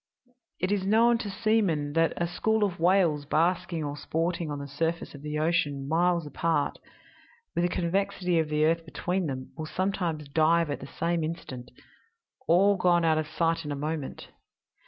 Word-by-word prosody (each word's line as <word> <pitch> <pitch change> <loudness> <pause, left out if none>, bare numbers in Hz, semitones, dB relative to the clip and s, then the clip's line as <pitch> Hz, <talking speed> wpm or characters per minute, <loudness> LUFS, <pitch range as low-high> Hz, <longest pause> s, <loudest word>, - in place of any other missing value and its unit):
"It 185 +2 0
is 205 -2 +1
known 230 +4 +4
to 215 - -4
seamen 195 -9 +1
that 165 +1 +2
a 170 - 0
school 220 +5 0
of 190 -5 -1
whales 170 -4 +3
basking 165 +1 0
or 145 -1 -3
sporting 165 +2 -2
on 145 - -3
the 140 0 -6
surface 165 +4 -2
of 140 - -10
the 150 0 -4
ocean, 150 -4 0
miles 170 +1 +2
apart, 155 0 -1 0.7
with - - 0
the - - +1
convexity 180 0 0
of 160 -1 0
the 150 0 +2
earth 165 +1 +2
between 175 +3 -2
them, 130 -2 -5
will 155 -1 -4
sometimes 175 -5 -2
dive 160 +2 +2
at 145 - -3
the 135 - -8
same 170 +2 -1
instant 135 -6 -6 0.8
all 195 +4 +5
gone 175 -2 +3
out 160 -1 +3
of 155 - -3
sight 165 +1 0
in 150 - -5
a - - -2
moment. 150 0 -4
165 Hz, 175 wpm, -28 LUFS, 150-180 Hz, 0.8 s, all